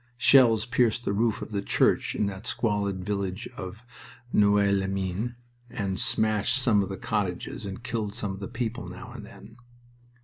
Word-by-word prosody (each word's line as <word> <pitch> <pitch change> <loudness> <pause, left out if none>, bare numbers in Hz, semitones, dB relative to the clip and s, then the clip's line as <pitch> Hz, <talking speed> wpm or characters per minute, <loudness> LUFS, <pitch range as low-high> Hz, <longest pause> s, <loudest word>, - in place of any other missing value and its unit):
Shells 115 -3 +6
pierced 120 -1 +1
the 100 - 0
roof 110 +1 +1
of - - -9
the 100 -1 -1
church - - +2
in - - +1
that 100 +1 -5
squalid 100 -4 -1
village 100 +1 -2
of 100 +3 -8 0.5
Noeux 100 -1 +4
les 95 -1 +1
Mines 95 +4 -2 0.4
and 95 -4 -2
smashed 110 +4 +2
some 115 -5 +3
of 100 - -3
the 95 - -4
cottages 100 -1 -3
and 100 +4 -7
killed 110 -4 -3
some 105 -4 -2
of 95 - -7
the 100 - -5
people 120 -3 -4
now 90 +1 -9
and - - -9
then. 110 +3 -13
105 Hz, 175 wpm, -27 LUFS, 95-115 Hz, 0.5 s, Shells